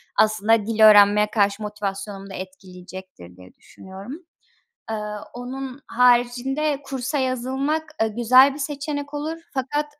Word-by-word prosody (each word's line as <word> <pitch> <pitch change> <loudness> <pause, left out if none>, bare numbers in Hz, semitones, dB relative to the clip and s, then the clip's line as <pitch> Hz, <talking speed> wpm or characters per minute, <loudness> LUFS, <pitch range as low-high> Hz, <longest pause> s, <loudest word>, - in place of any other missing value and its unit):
aslında 215 0 +2
dil 220 0 +1
öğrenmeye 205 0 +6
karşı 200 0 +1
motivasyonumu 200 -1 -6
da - - -9
etkileyecektir 185 - -11
diye 90 0 -16
düşünüyorum. 190 +6 -12 0.8
Eee, 220 - -2 0.4
onun 260 +2 -7
haricinde 250 +4 +1
kursa 270 +2 -3
yazılmak, 265 +4 -1 0.2
eee, 225 - +2
güzel 255 +5 +5
bir - - -9
seçenek 285 0 -5
olur 310 +3 -4 0.2
fakat, 290 +3 -2
240 Hz, 120 wpm, -22 LUFS, 200-270 Hz, 0.8 s, öğrenmeye